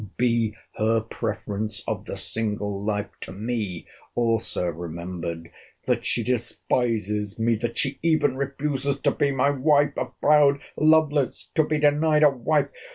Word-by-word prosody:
Be 115 Hz, -3 st, +1 dB, 0.2 s
her 110 Hz, +1 st, +2 dB
preference 110 Hz, -2 st, -4 dB
of -, -, -3 dB
the -, -, -5 dB
single 105 Hz, -2 st, -2 dB
life 105 Hz, -1 st, -2 dB
to -, -, -7 dB
me 105 Hz, -3 st, -3 dB, 0.3 s
also 115 Hz, -5 st, 0 dB
remembered!—That 85 Hz, 0 st, -5 dB
she -, -, +1 dB
despises 110 Hz, -4 st, -1 dB
me!—That 115 Hz, 0 st, 0 dB
she 135 Hz, -, -1 dB
even 155 Hz, -5 st, +2 dB
refuses 140 Hz, 0 st, -2 dB
to -, -, +3 dB
be 145 Hz, -2 st, +1 dB
my 140 Hz, +1 st, +2 dB
WIFE!—A 145 Hz, +1 st, +2 dB
proud 145 Hz, -2 st, +5 dB, 0.2 s
Lovelace 155 Hz, -3 st, +2 dB
to 155 Hz, -, +4 dB
be 155 Hz, 0 st, 0 dB
denied 150 Hz, +1 st, +3 dB
a 150 Hz, -, +7 dB
wife! 140 Hz, +3 st, +1 dB
120 Hz, 130 wpm, -25 LUFS, 105-145 Hz, 0.3 s, a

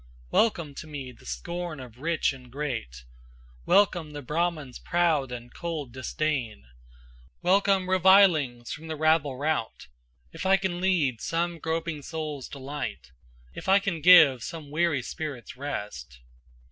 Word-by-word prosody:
Welcome 170 Hz, -10 st, +2 dB
to -, -, -7 dB
me 140 Hz, -4 st, -7 dB
the 120 Hz, -, -17 dB
scorn 175 Hz, -3 st, -5 dB
of 125 Hz, -2 st, -11 dB
rich 160 Hz, 0 st, 0 dB
and 125 Hz, -2 st, -13 dB
great, 120 Hz, -, -4 dB, 0.6 s
Welcome 175 Hz, -6 st, +3 dB
the 145 Hz, -1 st, -7 dB
Brahman's 155 Hz, -2 st, -2 dB
proud 160 Hz, -7 st, +1 dB
and 120 Hz, 0 st, -8 dB
cold 160 Hz, -7 st, -5 dB
disdain, 130 Hz, -, -2 dB, 0.8 s
Welcome 195 Hz, +1 st, +3 dB
revilings 180 Hz, -10 st, +4 dB
from 160 Hz, +2 st, -7 dB
the 160 Hz, -, -3 dB
rabble 155 Hz, -3 st, +2 dB
rout, 150 Hz, -5 st, -2 dB, 0.5 s
If -, -, -6 dB
I 190 Hz, +1 st, +5 dB
can 180 Hz, -2 st, -3 dB
lead 155 Hz, -11 st, +1 dB
some 170 Hz, 0 st, -1 dB
groping 160 Hz, -1 st, -3 dB
souls 150 Hz, -3 st, -5 dB
to -, -, -8 dB
light 135 Hz, -, -6 dB, 0.4 s
If -, -, -6 dB
I 195 Hz, -, +7 dB
can 195 Hz, -5 st, -2 dB
give 155 Hz, -7 st, +8 dB
some 155 Hz, 0 st, -7 dB
weary 155 Hz, -4 st, +1 dB
spirits 145 Hz, -6 st, -6 dB
rest. 105 Hz, -, -6 dB
155 Hz, 140 wpm, -27 LUFS, 130-170 Hz, 0.8 s, give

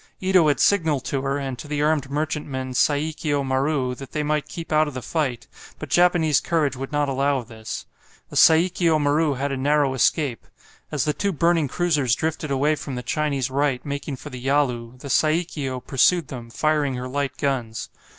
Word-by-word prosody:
Ito 185 Hz, -3 st, +4 dB
had 145 Hz, -4 st, +2 dB
signalled 160 Hz, -9 st, +2 dB
to 135 Hz, -, -1 dB
her, 135 Hz, +1 st, -1 dB
and 135 Hz, -3 st, -4 dB
to 150 Hz, -, -8 dB
the 145 Hz, 0 st, -1 dB
armed 150 Hz, -3 st, +1 dB
merchantman, 140 Hz, -3 st, -3 dB
"Saikio 145 Hz, +1 st, +1 dB
Maru," 135 Hz, 0 st, 0 dB
that 135 Hz, +1 st, -10 dB
they 150 Hz, -, -1 dB
might 150 Hz, 0 st, -1 dB
keep 165 Hz, -1 st, -7 dB
out 155 Hz, 0 st, +4 dB
of 145 Hz, -, -7 dB
the 130 Hz, -, -4 dB
fight, 140 Hz, -8 st, -2 dB, 0.3 s
but -, -, -8 dB
Japanese 175 Hz, -4 st, +4 dB
courage 150 Hz, -5 st, 0 dB
would 135 Hz, +1 st, -6 dB
not 145 Hz, -1 st, +1 dB
allow 140 Hz, +1 st, +1 dB
of 120 Hz, -4 st, -7 dB
this. 110 Hz, -1 st, -7 dB, 0.5 s
The -, -, -8 dB
"Saikio 165 Hz, 0 st, +4 dB
Maru" 145 Hz, 0 st, +2 dB
had 140 Hz, +2 st, -2 dB
a 135 Hz, -, -2 dB
narrow 145 Hz, 0 st, +2 dB
escape. 130 Hz, -1 st, 0 dB, 0.4 s
As 145 Hz, -5 st, 0 dB
the 150 Hz, -, +1 dB
two 200 Hz, +5 st, -1 dB
burning 170 Hz, -2 st, +2 dB
cruisers 145 Hz, -6 st, +1 dB
drifted 160 Hz, -1 st, -3 dB
away 140 Hz, +3 st, +2 dB
from 140 Hz, -3 st, -5 dB
the 125 Hz, -, -5 dB
Chinese 140 Hz, 0 st, -1 dB
right, 135 Hz, -2 st, 0 dB
making 140 Hz, 0 st, -4 dB
for -, -, -10 dB
the 125 Hz, -, -7 dB
Yalu, 125 Hz, -4 st, 0 dB
the 140 Hz, -, -9 dB
"Saikio" 155 Hz, -5 st, 0 dB
pursued 145 Hz, +5 st, +2 dB
them, 120 Hz, -3 st, -8 dB
firing 145 Hz, +2 st, 0 dB
her 125 Hz, +1 st, -4 dB
light 140 Hz, +1 st, -3 dB
guns. 125 Hz, -6 st, -2 dB
145 Hz, 190 wpm, -23 LUFS, 130-155 Hz, 0.5 s, Ito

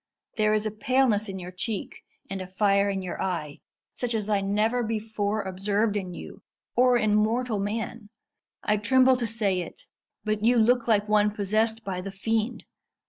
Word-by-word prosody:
There 215 Hz, -1 st, +3 dB
is 215 Hz, 0 st, 0 dB
a 215 Hz, -, -1 dB
paleness 220 Hz, -1 st, +1 dB
in 190 Hz, -, -5 dB
your 180 Hz, -1 st, -7 dB
cheek, 195 Hz, +3 st, -5 dB, 0.3 s
and 195 Hz, 0 st, -5 dB
a 185 Hz, -, -6 dB
fire 200 Hz, +1 st, +2 dB
in 195 Hz, -1 st, -2 dB
your 180 Hz, -, -5 dB
eye, 165 Hz, -6 st, -3 dB, 0.3 s
such 240 Hz, -2 st, -2 dB
as 215 Hz, -1 st, -2 dB
I 200 Hz, -1 st, +2 dB
never 210 Hz, +5 st, +1 dB
before 215 Hz, -2 st, -2 dB
observed 200 Hz, +3 st, 0 dB
in 190 Hz, -3 st, -3 dB
you, 175 Hz, -, -9 dB, 0.3 s
or 250 Hz, 0 st, +5 dB
in 215 Hz, -3 st, +2 dB
mortal 220 Hz, +1 st, +1 dB
man. 215 Hz, +2 st, -4 dB, 0.5 s
I 210 Hz, -, +2 dB
tremble 260 Hz, +5 st, +4 dB
to 240 Hz, -2 st, -1 dB
say 205 Hz, -4 st, 0 dB
it, 170 Hz, -, -9 dB, 0.4 s
but 215 Hz, 0 st, -1 dB
you 240 Hz, +2 st, +4 dB
look 240 Hz, +1 st, +3 dB
like 210 Hz, -2 st, +3 dB
one 210 Hz, 0 st, +4 dB
possessed 215 Hz, +2 st, 0 dB
by 185 Hz, -2 st, -3 dB
the 195 Hz, +1 st, -6 dB
fiend. 220 Hz, +4 st, -2 dB
210 Hz, 180 wpm, -26 LUFS, 200-225 Hz, 0.5 s, or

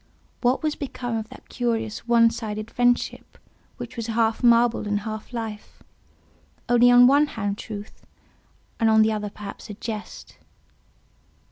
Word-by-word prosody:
What 250 Hz, +4 st, +1 dB
was 305 Hz, -1 st, +1 dB
become 245 Hz, -4 st, -5 dB
of 220 Hz, -1 st, -4 dB
that -, -, -14 dB
curious 230 Hz, -2 st, -3 dB
one 230 Hz, -1 st, +5 dB
sided 215 Hz, -1 st, -5 dB
friendship 245 Hz, 0 st, 0 dB, 0.4 s
which 245 Hz, -1 st, -8 dB
was 230 Hz, -2 st, -4 dB
half 225 Hz, -1 st, 0 dB
marble 235 Hz, -2 st, +3 dB
and 205 Hz, 0 st, 0 dB
half 215 Hz, +2 st, -7 dB
life; 220 Hz, -3 st, -7 dB, 0.8 s
only 245 Hz, 0 st, +5 dB
on 245 Hz, 0 st, +8 dB
one 285 Hz, +3 st, +5 dB
hand 205 Hz, -5 st, -4 dB
truth, 210 Hz, -1 st, -9 dB, 0.8 s
and 225 Hz, -1 st, +3 dB
on 220 Hz, 0 st, +5 dB
the 220 Hz, -, +2 dB
other 210 Hz, -1 st, -3 dB
perhaps 205 Hz, +1 st, -10 dB
a 210 Hz, -, -6 dB
jest? 215 Hz, 0 st, -8 dB
225 Hz, 145 wpm, -24 LUFS, 215-245 Hz, 0.8 s, on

